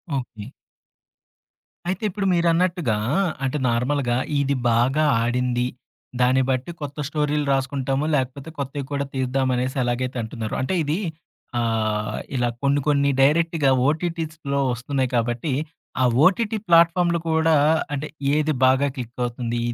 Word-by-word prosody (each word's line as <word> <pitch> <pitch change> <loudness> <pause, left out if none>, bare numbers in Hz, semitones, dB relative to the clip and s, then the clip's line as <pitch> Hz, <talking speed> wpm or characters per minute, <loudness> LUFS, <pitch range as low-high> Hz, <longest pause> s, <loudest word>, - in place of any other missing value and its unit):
Okay. 115 -5 -5 1.4
అయితే 190 +3 -2
ఇప్పుడు 200 +1 -3
మీరన్నట్టుగా 170 - +1 0.5
అంటే, 135 +3 0
నార్మల్‌గా 125 +1 0 0.2
ఇది 140 0 0 0.2
బాగా 130 +7 +2 0.2
ఆడింది 125 0 0 0.5
దాన్ని 130 +2 +4
బట్టి 130 +5 -1
కొత్త 145 0 -6
స్టోరీలు 150 -1 0
రాసుకుంటాము 135 +1 -1
లేకపోతే, 135 +2 -3
కొత్తవి 140 +1 -3
కూడా 140 0 -1
తీద్దామనేసి 130 0 0
ఎలాగైతే 125 +1 -2
అంటున్నారో. 110 0 -5
అంటే 185 - -1
ఇది 155 +6 -1 0.6
ఆహ్, 110 -2 -1 0.2
ఇలా 120 -1 +1 0.2
కొన్ని 140 +1 +3
కొన్ని 140 -1 +3
డైరెక్ట్‌గా 155 +1 +3 0.2
ఓటీటీస్‌లో 160 -3 -2
వస్తున్నాయి 130 +2 -2
కాబట్టి 120 +5 -1 0.5
ఆ - - +4 0.2
ఓటీటీ 220 +4 +2
ప్లాట్‌ఫాములు 170 +1 +4
కూడా 160 0 +3 0.4
అంటే 145 +2 -3 0.3
ఏది 155 0 +2
బాగా 130 +2 +4
క్లిక్ 125 -2 -7
అవుతుంది. 120 -1 -2
140 Hz, 120 wpm, -23 LUFS, 125-155 Hz, 1.4 s, దాన్ని